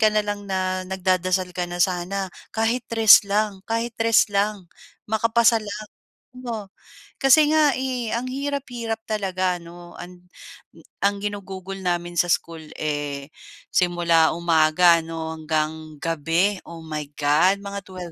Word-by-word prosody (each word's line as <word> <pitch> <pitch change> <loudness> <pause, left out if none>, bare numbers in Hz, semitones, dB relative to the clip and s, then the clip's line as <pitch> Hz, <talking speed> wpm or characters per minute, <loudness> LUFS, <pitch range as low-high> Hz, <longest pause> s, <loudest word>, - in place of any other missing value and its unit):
ka 215 - +6
na 215 0 +1
lang 205 -1 -5
na 185 -1 -1
nagdadasal 185 -1 0
ka 180 0 -3
na, 175 - -5
"Sana 185 +1 -3 0.2
kahit 225 +2 0
3 225 -3 +7
lang, 205 -1 0
kahit 230 +1 -1
3 225 -1 +3
lang, 200 -2 -1 0.4
makapasa 230 +1 +3
lang." 210 0 -7 0.4
Oo, 230 -6 -7 0.5
kasi, 295 +3 +6
eh, - - 0
nga 305 -2 +5 0.5
ang 255 - -6
hirap-hirap 255 -4 -4
talaga 185 -4 -1
ano, 175 +1 -13
an 180 0 -10 0.8
ang 200 0 +1
ginugugol 195 -2 -5
namin 175 -1 -2
sa 175 - +3
school, 165 -1 -1 0.2
eh, 145 -1 -4 0.4
simula 170 -3 +3
umaga 170 0 +4
'no, 160 0 -5
hanggang 155 0 -3
gabi, 165 +5 0
oh 165 -1 -10
my 155 -2 -5
God! 160 +7 +2
Mga 200 0 -5
12 180 -2 -8
185 Hz, 135 wpm, -23 LUFS, 170-215 Hz, 0.8 s, 3